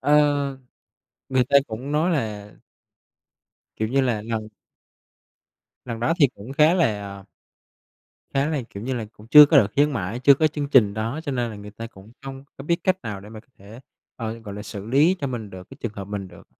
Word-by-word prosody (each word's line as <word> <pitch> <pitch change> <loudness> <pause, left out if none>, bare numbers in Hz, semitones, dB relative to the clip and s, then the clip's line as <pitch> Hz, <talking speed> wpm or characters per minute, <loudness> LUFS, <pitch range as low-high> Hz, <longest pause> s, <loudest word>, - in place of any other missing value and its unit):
Ờ. 145 -2 +2 0.7
Người 130 -1 +3
ta - - 0
cũng 120 +6 -6
nói 155 +4 +2
là 105 -9 -3 1.3
kiểu 110 - -1
như 135 +4 +2
là, 120 -5 0
lần 110 -1 -4 1.4
lần 115 -2 -6
đó 160 +8 +1
thì 140 - +7
cũng 105 +6 -9
khá 155 +5 +4
là 100 - -1 1.1
khá 135 +1 +2
là, 150 -5 -1
kiểu 100 -2 -8
như 130 +3 -2
là, 115 -3 -3
cũng 105 - -16
chưa 150 +4 +10
có 150 - +4
đợt 115 - +5
khuyến 145 +1 +3
mãi, 110 0 -3
chưa 140 - +8
có 155 +3 +2
chương 145 -2 -3
trình 105 -8 +4
đó 115 +8 -3
cho 140 - -3
nên 120 -2 -1
là 105 - -8
người 105 0 -10
ta 115 +2 -8
cũng 105 0 -16
không 135 0 -8
có 135 - -9
biết 170 +3 +1
cách 185 0 +1
nào 105 -4 -5
để 100 - -12
mà 110 0 -10
có - - -32
thể, 105 +5 -13 0.4
ờ, 115 -1 -5
gọi 105 -3 -9
là, 105 - -7
xử 100 -2 -8
lý 145 +10 +3
cho 140 - -1
mình 115 -6 -5
được 95 -1 -11
cái 135 - -11
trường 115 - -4
hợp 100 - -6
mình 100 -1 -6
được. - - -16
120 Hz, 215 wpm, -23 LUFS, 105-140 Hz, 1.4 s, chưa